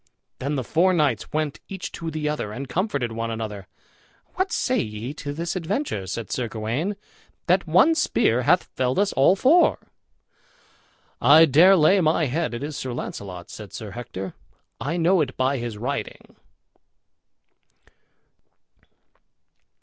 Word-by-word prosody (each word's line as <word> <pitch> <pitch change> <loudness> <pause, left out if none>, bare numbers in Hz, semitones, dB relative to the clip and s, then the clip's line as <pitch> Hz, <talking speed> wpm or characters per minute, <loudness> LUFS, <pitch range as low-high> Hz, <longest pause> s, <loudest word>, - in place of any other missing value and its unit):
Then 140 +3 -2
the 130 - -2
four 180 +8 +2
knights 145 - 0
went 155 -2 -2
each 190 -2 -6
to 165 - -5
the 155 -1 -3
other 150 -9 -2
and 135 +5 -6
comforted 140 - -1
one 115 +1 -3
another. 105 -4 -5 0.7
"What 375 0 -1
say 255 - 0
ye 110 +4 -4
to 145 -1 -6
this 170 +5 -4
adventure," 180 - -2
said 110 +4 -5
Sir 125 -2 -1
Gawain, 115 - -3 0.5
"that 185 +1 +2
one 185 - +5
spear 125 - +1
hath 160 +8 +3
felled 130 0 -2
us 200 0 +2
all 135 +8 +4
four?" 290 - +4 1.4
"I 155 +3 +8
dare 165 +7 +6
lay 185 +3 +4
my 160 0 +2
head 150 0 -2
it 120 - -5
is 150 0 -5
Sir 130 -2 -4
Launcelot," 95 -6 -7
said 105 -3 -10
Sir 110 -3 -7
Hector; 95 -5 -7 0.5
"I 165 +5 -2
know 175 +1 +3
it 130 -3 -3
by 130 +1 +1
his 120 -3 -5
riding." 130 +6 -5
145 Hz, 145 wpm, -24 LUFS, 115-170 Hz, 1.4 s, I